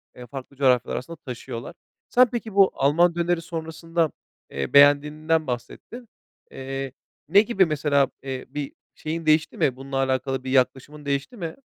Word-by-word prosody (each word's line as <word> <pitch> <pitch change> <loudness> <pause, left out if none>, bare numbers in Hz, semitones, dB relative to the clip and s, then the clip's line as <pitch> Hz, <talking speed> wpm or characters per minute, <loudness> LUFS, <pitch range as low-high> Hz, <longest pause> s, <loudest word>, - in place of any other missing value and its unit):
eee, 125 0 -11
farklı 135 +1 -9
coğrafyalar 130 -3 +2
arasında 165 +7 -6
taşıyorlar. 125 +2 -8 0.3
Sen 250 +1 +5
peki 220 -4 -5
bu 195 -1 +6
Alman 170 +5 +3
döneri 175 0 0
sonrasında, 165 -1 -2 0.4
eee, 70 -1 -4
beğendiğinden 150 +3 +4
bahsettin. 125 - -6 0.4
Eee, 135 0 -5 0.4
ne 200 +5 +7
gibi, 205 -3 +2
mesela, 145 -3 +1
eee, 130 -1 -5
bir 145 -2 -5 0.2
şeyin 160 +1 -5
değişti 155 0 +2
mi, 130 - +1
bununla 135 +1 -5
alakalı 135 0 -1
bir 130 - -4
yaklaşımın 135 +3 0
değişti 140 - -2
mi? 165 -3 -5
145 Hz, 150 wpm, -24 LUFS, 135-165 Hz, 0.4 s, ne